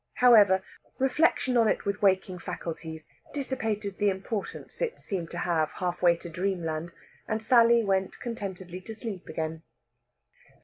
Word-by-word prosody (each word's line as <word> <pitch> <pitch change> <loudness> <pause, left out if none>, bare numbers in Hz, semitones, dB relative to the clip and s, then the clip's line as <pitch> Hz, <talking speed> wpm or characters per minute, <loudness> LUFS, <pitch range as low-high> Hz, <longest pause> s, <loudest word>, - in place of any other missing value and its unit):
However, 205 -6 +6 0.3
reflection 265 -1 +2
on 230 -2 +5
it - - 0
with 200 +1 -2
waking 190 -2 +2
faculties 160 -2 -6 0.3
dissipated 220 -8 -2
the 205 -1 +4
importance 195 +2 -5
it - - -1
seemed 180 -4 -4
to 175 - -7
have 165 -3 +1
half 180 -1 -3
way 175 -1 +5
to 170 - -9
dreamland, 170 -2 -2 0.4
and 220 - -1
Sally 235 +1 +5
went 195 -2 0
contentedly 190 -6 -6
to 220 +4 -8
sleep 215 -5 -6
again. 160 0 -3
195 Hz, 140 wpm, -28 LUFS, 175-225 Hz, 0.4 s, However